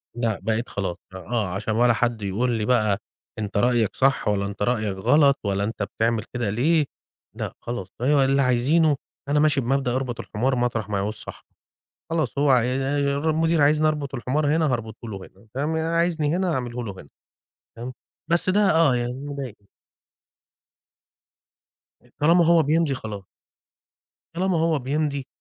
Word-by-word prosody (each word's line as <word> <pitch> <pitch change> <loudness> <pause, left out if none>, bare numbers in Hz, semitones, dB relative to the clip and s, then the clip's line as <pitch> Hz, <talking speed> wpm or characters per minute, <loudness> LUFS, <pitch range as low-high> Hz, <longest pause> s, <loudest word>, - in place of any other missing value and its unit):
لأ 115 -4 -1
بقيت 110 +4 -1
خلاص 95 -4 -3 0.2
آه 110 +2 -2
علشان 100 +4 -3
ولا 120 +1 +4
حد 120 0 0
يقول 105 +6 0
لي 110 -2 -1
بقى: 110 -5 +2 0.4
"أنت 100 -1 -3
رأيَك 120 -2 +2
صح 135 +1 +2
ولا 100 -1 +1
أنت 100 +1 -7
رأيَك 110 -4 0
غلط 140 +6 +4
ولا 100 -1 0
أنت 105 -1 -3
بتعمل 110 +2 -1
كده 120 -4 -1
ليه؟" 145 +8 +2 0.5
لأ - - -4
خلاص 120 -6 -5
فهو 140 +4 +3
اللي 135 +1 +3
عايزينه 140 +5 +3 0.3
أنا 150 - +3
ماشي 150 -2 +3
بمبدأ 130 0 0
أربط 130 -3 -3
الحمار 130 +5 -1
مطرح 120 -4 -1
ما 100 - -1
يعوز 100 +2 -1
صاحبه، - - -8 0.6
خلاص 160 -3 -1
هو 145 -1 +3
ع 125 -2 +5
المدير 145 +5 +1
عايزني 155 +2 +4
أربط 145 -3 -3
الحمار 145 +4 0
هنا 155 -5 +2
هاربُطه 115 0 -5
له 100 -3 -5
هنا 95 +2 -15
تم 145 +4 -1
عايزني 165 -1 +1
هنا 185 -2 0
هاعمله 125 -3 -3
له 100 - -5
هنا 70 - -15 0.7
تمام، 125 +2 -6 0.4
بس 170 +2 +2
ده 195 +3 +3
آه 160 -6 +4
يعني 120 0 -2
مضايقني. 135 -7 -7 2.5
طالما 170 +3 +5
هو 165 -1 +5
بيمضي 155 0 +2
خلاص. 105 -5 -7 1.1
طالما 180 0 0
هو 160 -2 +2
بيمضي 140 0 -2
125 Hz, 155 wpm, -24 LUFS, 110-150 Hz, 2.5 s, ع